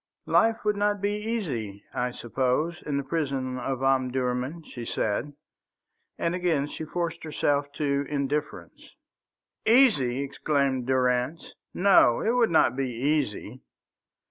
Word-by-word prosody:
"Life 225 -1 +2
would 210 -1 +1
not 205 0 +1
be 200 +1 0
easy, 165 - -3
I 125 0 -1
suppose, 130 +8 -1
in 145 -2 0
the 140 - -1
prison 135 -4 -2
of 130 +1 -3
Omdurman," 130 +3 0
she 120 -5 -8
said, 115 +5 -2 0.8
and 170 - -1
again 170 -6 0
she 160 - -6
forced 170 +1 -3
herself 145 -2 0
to 140 -2 -1
indifference. 145 +1 -4 0.7
"Easy!" 150 - +4
exclaimed 140 -2 -1
Durrance; 130 +4 0 0.2
"no, 185 -11 +5
it 225 - +1
would 240 -2 +3
not 160 - +3
be 135 -1 -1
easy. 125 -2 -2
140 Hz, 125 wpm, -26 LUFS, 130-170 Hz, 0.8 s, no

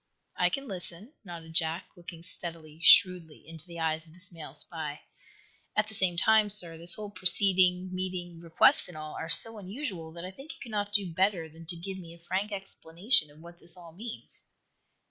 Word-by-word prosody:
"I - - +1
can 275 -1 -5
listen," 190 - -7
nodded 165 -4 -11
Jack, 160 +1 0
looking 170 -2 -11
steadily, 165 -3 -1
shrewdly 175 -5 +4
into 165 +1 -11
the 170 -1 -10
eyes 160 -1 -2
of 160 -1 -21
this 180 +1 -1
male 155 -4 -11
spy. 150 -1 -7 0.7
"At 210 0 +1
the - - -8
same 185 -4 -1
time, 220 +3 +3
sir, 180 -5 +3
this 170 +1 +6
whole 210 -1 -8
proceeding, 185 -1 +4
meeting, 180 -2 -6
request 165 -1 +3
and 175 -3 -12
all 155 0 -8
are 160 - -7
so 225 +5 +7
unusual 190 - -7
that 170 +1 -9
I 185 - -8
think 275 +11 -11
you - - -19
cannot 205 -4 -5
do 195 -5 0
better 185 -2 0
than 160 +1 -16
to 175 - -4
give 190 +3 -8
me 170 -2 -12
a 170 0 -21
frank 195 +4 -3
explanation 195 - 0
of 150 +2 -19
what 170 +1 -15
this 175 +1 -8
all 170 -2 -13
means." 220 +7 -10
175 Hz, 195 wpm, -28 LUFS, 165-195 Hz, 0.7 s, so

